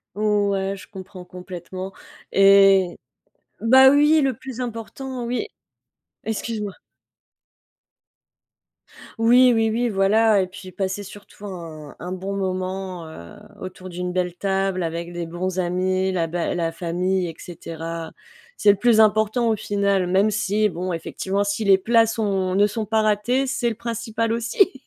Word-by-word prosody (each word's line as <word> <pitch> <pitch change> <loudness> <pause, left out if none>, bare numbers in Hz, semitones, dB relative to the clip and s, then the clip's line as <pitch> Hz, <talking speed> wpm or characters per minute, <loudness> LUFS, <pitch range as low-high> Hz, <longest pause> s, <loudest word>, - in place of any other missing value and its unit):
Ouais, 200 -2 0
je - - -13
comprends 190 -2 -10
complètement 180 +1 -8 0.4
et 195 -2 +5 0.6
bah 265 +3 +7
oui, 295 +3 +5
le 270 -3 +1
plus 260 -2 -8
important, 245 +2 -5
oui 250 - -2 0.8
excuse-moi. 220 -2 -3 2.5
Oui, 245 +2 +6
oui, 225 -1 +2
oui, 235 +2 0
voilà 210 +1 +3
et 185 - -2
puis 185 0 -11
passer 190 +2 -3
surtout 205 +1 -12
un 165 -6 -8
un 180 +1 -6
bon 190 +2 -4
moment, 185 -2 -3
heu, 85 - -11 0.3
autour 185 0 -8
d'une 180 0 -4
belle 180 -1 -1
table 195 -1 -1
avec 170 +1 -4
des 175 -1 -4
bons 185 +2 -3
amis, 185 +1 0
la 175 -3 0
bé 170 +2 -2
la 165 -1 -1
famille 180 +2 -1
et 165 - -7
cetera. 165 -1 -7 0.5
C'est 205 - +5
le 200 - -1
plus 230 +1 +3
important, 220 +2 +3
au 220 - +2
final, 200 -3 0
même 195 +4 +3
si 215 0 +1
bon, 180 +1 -4
effectivement, 190 +4 -2
si 205 +2 -2
les 195 -2 +5
plats 225 +3 +3
sont 195 -4 -1
ne 200 +1 +5
sont 215 +1 -3
pas 220 0 +1
ratés, 215 +6 +1
c'est 255 -2 -1
le 225 - -4
principal 230 0 -3
aussi. 245 - +2
195 Hz, 145 wpm, -22 LUFS, 185-220 Hz, 2.5 s, bah